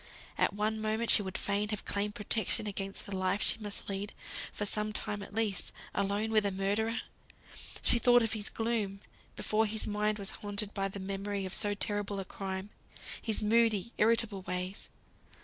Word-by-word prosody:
At - - +2
one 215 +1 0
moment 220 +2 +1
she - - +8
would 190 -2 -4
fain 205 +1 0
have 210 -2 -3
claimed 205 0 -1
protection 215 +1 +2
against 195 -1 -3
the 200 - -4
life 185 +2 +1
she - - +3
must 205 -2 -5
lead, 200 +1 -2 0.4
for 205 - -3
some 210 +1 +1
time 205 -1 -2
at 200 0 -9
least, 215 -4 +1 0.2
alone 200 +3 0
with 215 -1 +5
a 200 - +2
murderer! 205 +4 0 0.8
She 235 - +6
thought 245 0 +6
of 225 - 0
his 215 -1 0
gloom, 220 -4 -1 0.3
before 220 +1 +2
his 215 +1 0
mind 210 0 0
was 200 -2 -5
haunted 205 0 -2
by 195 -1 0
the 195 +1 -7
memory 195 +1 -3
of 185 - -5
so 205 -1 +1
terrible 205 -1 -1
a 195 - -4
crime; 190 +1 -5 0.5
his 220 -2 +1
moody, 225 0 +3
irritable 220 -2 +3
ways. 180 +1 -4
205 Hz, 180 wpm, -32 LUFS, 195-220 Hz, 0.8 s, she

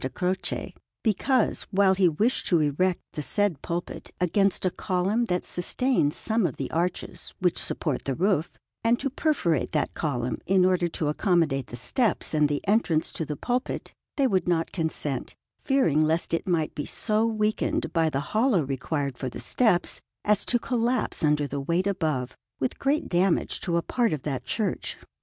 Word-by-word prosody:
Croce, 185 +1 -2 0.3
because, 250 +4 +2
while 195 -1 +4
he 185 -2 +4
wished 215 +11 +1
to 175 - +4
erect 165 +5 +1
the 150 - -4
said 195 -1 +2
pulpit 175 0 -5
against 195 +2 +2
a 185 - +2
column 195 +7 0
that 180 -5 -1
sustains 175 - +1
some 220 -4 +2
of 140 - -6
the 135 - -5
arches 175 +2 -3
which 180 -2 +1
support 150 -6 -2
the 135 - -1
roof, 180 -2 +1 0.3
and 230 +1 +3
to 275 0 -2
perforate 260 - 0
that 150 - 0
column 125 -6 -2
in 190 -1 +4
order 180 -1 +2
to 160 -2 -3
accommodate 150 - +1
the - - -8
steps 180 - +1
and 150 -1 +3
the 145 +3 -3
entrance 185 -7 +2
to 160 - -4
the 150 - -4
pulpit, 245 - -3 0.2
they 275 - +3
would 190 -8 +1
not 165 -2 +1
consent, 155 -6 -3 0.2
fearing 260 - +2
lest 160 +2 +1
it 165 - -1
might 165 -4 0
be 145 - -4
so 215 0 0
weakened 215 -1 -1
by 165 -2 +3
the 135 - -1
hollow 220 - +3
required 135 0 -3
for 130 - -2
the 120 - -8
steps 180 - +2 0.2
as 210 -1 +3
to 245 - +3
collapse 240 -2 -1
under 150 -1 +3
the 140 0 -4
weight 170 +6 0
above, 155 -10 -1 0.2
with 130 - -2
great 280 +3 +1
damage 180 0 +1
to 170 -2 0
a 170 - 0
part 235 0 +1
of 145 - -4
that 135 -4 -3
church. 215 - -2
175 Hz, 175 wpm, -26 LUFS, 150-210 Hz, 0.3 s, while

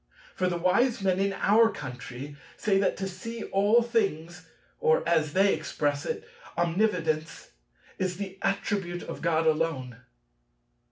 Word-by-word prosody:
For 185 - 0
the 175 -1 -1
wise 230 +7 +2
men 190 -1 +2
in 195 0 +1
our 220 +4 +4
country 125 - -7 0.2
say 200 -3 +2
that 200 - +1
to 195 - -3
see 220 +5 -6
all 205 +5 +3
things, 175 -8 -2 0.3
or 160 +1 +2
as 155 -3 +2
they 195 +1 +4
express 145 -2 -2
it, - - -4 0.3
omnividence, 165 -3 0 0.5
is 185 -1 -1
the 190 -1 -6
attribute 195 -3 -1
of - - -7
God 165 -1 +1
alone." 155 -6 0
180 Hz, 135 wpm, -28 LUFS, 160-200 Hz, 0.5 s, our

